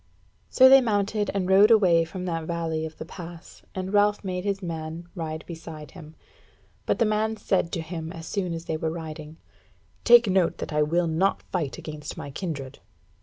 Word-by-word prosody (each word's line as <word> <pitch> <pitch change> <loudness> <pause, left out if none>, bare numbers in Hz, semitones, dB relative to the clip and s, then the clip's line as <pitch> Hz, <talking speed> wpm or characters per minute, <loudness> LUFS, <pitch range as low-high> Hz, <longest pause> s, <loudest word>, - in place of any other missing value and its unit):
So 260 - +7
they 270 0 +8
mounted 210 -2 0
and 195 -2 -1
rode 195 +3 +6
away 180 -7 +5
from 180 +2 -6
that 165 -2 -3
valley 160 -1 -2
of 155 - -14
the - - -7
pass, 170 0 -11
and 190 +1 -4
Ralph 205 0 +3
made 180 -1 -3
his 200 -1 -2
man 165 0 -5
ride 160 -3 -5
beside 160 -3 -9
him. 160 -4 -12 0.7
But - - +2
the 230 - +3
man 215 +1 0
said 185 -5 0
to 170 - -1
him, 160 0 -6
as 165 -1 -8
soon 185 0 -2
as 165 0 -7
they 160 - -2
were 160 0 -2
riding: 160 -1 -7 0.7
"Take 240 -1 +7
note 190 -3 +2
that - - -5
I 150 - +2
will 170 +4 +2
not 165 +4 +1
fight 160 -7 -2
against 150 -1 -7
my 140 - -7
kindred." 140 -4 -5
170 Hz, 190 wpm, -26 LUFS, 160-195 Hz, 0.7 s, they